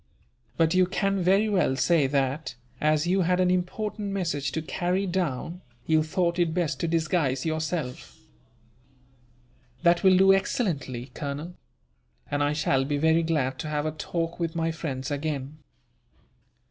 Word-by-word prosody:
But 165 0 +3
you 185 0 +4
can 195 0 0
very 195 +4 +3
well 185 -10 +2
say 140 +2 +3
that, 135 0 -1 0.3
as 155 +1 +2
you 185 +2 +2
had 180 +1 +2
an 180 -1 +3
important 205 +3 -2
message 165 -8 -2
to 160 - -1
carry 180 +4 -1
down, 175 -2 -2 0.2
you 160 -1 +3
thought 170 +2 0
it 170 -2 +1
best 160 -7 -1
to 170 - -1
disguise 160 -5 0
yourself." 155 -4 -3 1.7
"That 170 0 +4
will 190 -1 +6
do 195 +1 +6
excellently, 145 - -1
Colonel; 150 +4 -5 0.8
and 145 0 0
I 145 +1 +2
shall 135 -3 +1
be 145 +2 -1
very 160 +2 +3
glad 150 -6 -1
to - - -4
have 150 0 -1
a 155 - 0
talk 165 +2 -4
with 165 -1 -2
my 165 0 0
friends 140 -4 -4
again." 145 0 -3
160 Hz, 150 wpm, -26 LUFS, 145-180 Hz, 1.7 s, will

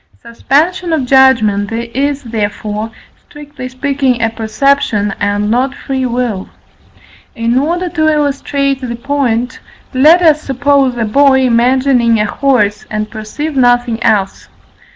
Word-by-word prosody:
Suspension 320 +9 -1
of 295 -5 0
judgment 230 -6 +3
is, 260 +5 -2
therefore, 215 -1 -4 0.3
strictly 290 -3 -10
speaking, 260 -1 -1
a 225 -1 0
perception, 220 -2 0
and 205 +1 -1
not 255 +3 0
free 265 -1 -3
will. 235 -5 -3 0.9
In 230 0 -1
order 340 +7 0
to 315 -2 +1
illustrate 280 -2 -1
the 240 -2 -4
point, 250 -2 -2 0.3
let 310 +7 +5
us 310 -2 +4
suppose 275 -2 +1
a 230 - -1
boy 265 +4 +3
imagining 245 -1 +2
a 210 - +1
horse, 215 -4 0
and 215 0 -4
perceive 280 +8 -5
nothing 245 -2 +2
else. 200 -3 0
255 Hz, 125 wpm, -13 LUFS, 225-280 Hz, 0.9 s, let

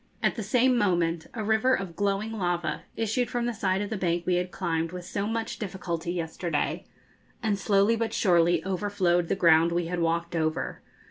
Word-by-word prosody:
At - - +3
the 225 - -4
same 250 +4 +3
moment 170 -5 +1
a 220 - -3
river 220 +5 +3
of 185 -4 -5
glowing 200 +2 0
lava 175 -6 -1
issued 225 +2 0
from 240 -2 -1
the 240 - -1
side 195 -2 0
of 205 - -6
the 220 - -1
bank 175 -2 -1
we 180 -1 +2
had 180 0 -1
climbed 165 -3 -2
with 180 -1 -7
so 200 +3 -2
much 225 0 -3
difficulty 175 -4 -4
yesterday, 165 -2 -2 0.6
and 205 -3 +1
slowly 200 +3 +3
but 225 -1 -1
surely 175 -5 +3
overflowed 185 -3 +1
the - - 0
ground 165 -2 +5
we 170 0 0
had 175 +1 -3
walked 170 +1 0
over. 155 -1 -1
185 Hz, 190 wpm, -27 LUFS, 170-215 Hz, 0.6 s, ground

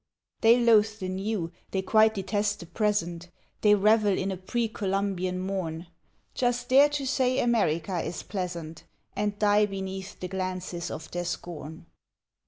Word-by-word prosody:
They 230 +2 +6
loathe 220 -2 +4
the 185 -3 -4
new, 190 -2 -2 0.2
they 190 -1 -2
quite 220 +2 +4
detest 205 +1 -1
the - - -8
present; 175 -2 -1 0.3
They 210 -1 +6
revel 210 -1 +3
in 195 +1 -1
a - - -2
pre 225 +6 -2
Columbian 195 -3 -2
morn; 185 -3 -3 0.5
Just 245 -1 -1
dare 275 +3 +7
to 290 -2 -3
say 260 -1 +1
America 190 -7 +1
is 175 - -5
pleasant, 170 -5 -5 0.3
And 205 -1 -1
die 210 0 +4
beneath 190 0 -6
the 180 - -4
glances 185 -2 -4
of 160 - -7
their 175 0 -3
scorn. 160 -2 -6
195 Hz, 150 wpm, -27 LUFS, 180-220 Hz, 0.5 s, dare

